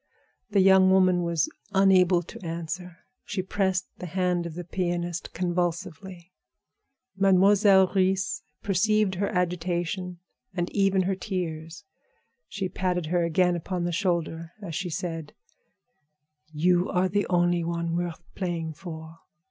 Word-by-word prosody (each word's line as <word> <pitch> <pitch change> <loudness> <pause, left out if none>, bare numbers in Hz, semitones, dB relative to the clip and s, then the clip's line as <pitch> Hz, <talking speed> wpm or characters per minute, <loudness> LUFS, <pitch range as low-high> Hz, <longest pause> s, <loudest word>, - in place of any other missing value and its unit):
The 200 -2 +3
young 190 0 +6
woman 185 -1 +4
was 170 -3 +1 0.3
unable 185 -2 +4
to 225 +5 -11
answer; 170 +1 -6 0.2
she 195 -3 -3
pressed 190 -1 0
the 180 - -6
hand 180 0 0
of 160 - -9
the 175 - -5
pianist 175 -1 -3
convulsively. 175 0 -3 0.8
Mademoiselle 195 0 +5
Reisz 190 -1 +1 0.2
perceived 205 +1 +2
her 200 +2 -1
agitation 180 -1 -2 0.4
and 175 -1 -2
even 195 -2 +2
her 190 +2 0
tears. 170 -5 -5 0.6
She 195 -2 -3
patted 180 -1 -1
her 175 -1 +3
again 175 +2 +2
upon 175 +1 -3
the 175 - -1
shoulder 170 -2 -1
as 190 -6 -7
she 180 +4 -3
said: 165 -2 -4 1.2
"You 175 +4 +2
are 185 0 +2
the 205 +2 0
only 175 -1 +2
one 170 0 -2
worth 175 -1 -3
playing 170 -4 -3
for. 160 0 -9
180 Hz, 130 wpm, -26 LUFS, 170-190 Hz, 1.2 s, young